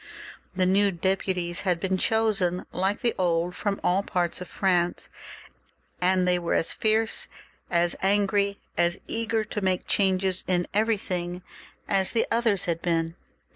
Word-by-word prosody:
The 185 0 +2
new 200 +2 +4
deputies 180 -1 -1
had 180 -3 0
been 190 +1 0
chosen 195 -3 +1
like 190 +3 -1
the 235 -2 +1
old 175 -1 +1
from 200 -1 -2
all 185 +2 +2
parts 180 -3 -1
of 180 - -6
France, 175 -3 0 0.9
and 185 0 +3
they 180 0 +3
were 170 - -1
as - - 0
fierce, 220 +1 +1 0.4
as 175 0 +1
angry, 200 0 +2 0.2
as 175 0 +1
eager 225 -1 -1
to 210 0 -5
make 185 -1 0
changes 190 -1 +1
in 175 -1 +2
everything, 185 -5 -1 0.4
as 195 -1 +2
the 230 - +2
others 230 -4 +1
had 170 -1 -2
been. 165 -1 0
185 Hz, 145 wpm, -26 LUFS, 175-205 Hz, 0.9 s, new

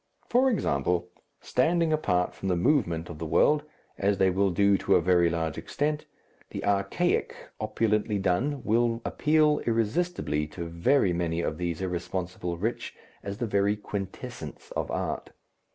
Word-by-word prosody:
For 255 +2 +4
example, 90 - 0 0.3
standing 165 +4 +2
apart 90 - +1
from - - -6
the 90 - +2
movement 85 - +1
of 80 -3 -9
the 80 - -4
world, 145 - +4 0.4
as 100 0 +2
they 95 0 +3
will 100 +2 +2
do 100 +3 +3
to 100 - +3
a - - +6
very 85 0 +3
large 80 -2 -2
extent, 150 +1 -2 0.4
the - - -5
archaic, 100 - +1 0.2
opulently 105 -1 0
done, 115 +9 0
will 115 +1 +1
appeal 150 0 +3
irresistibly 115 - 0
to 85 +3 -6
very 85 +5 +2
many 85 -1 -1
of 80 -1 -3
these 85 -1 -2
irresponsible 90 -1 -3
rich 110 +7 -3 0.3
as 100 0 -5
the 120 - -1
very 100 -1 +2
quintessence 100 -2 -7
of - - -3
art. - - -3
100 Hz, 150 wpm, -27 LUFS, 85-120 Hz, 0.4 s, a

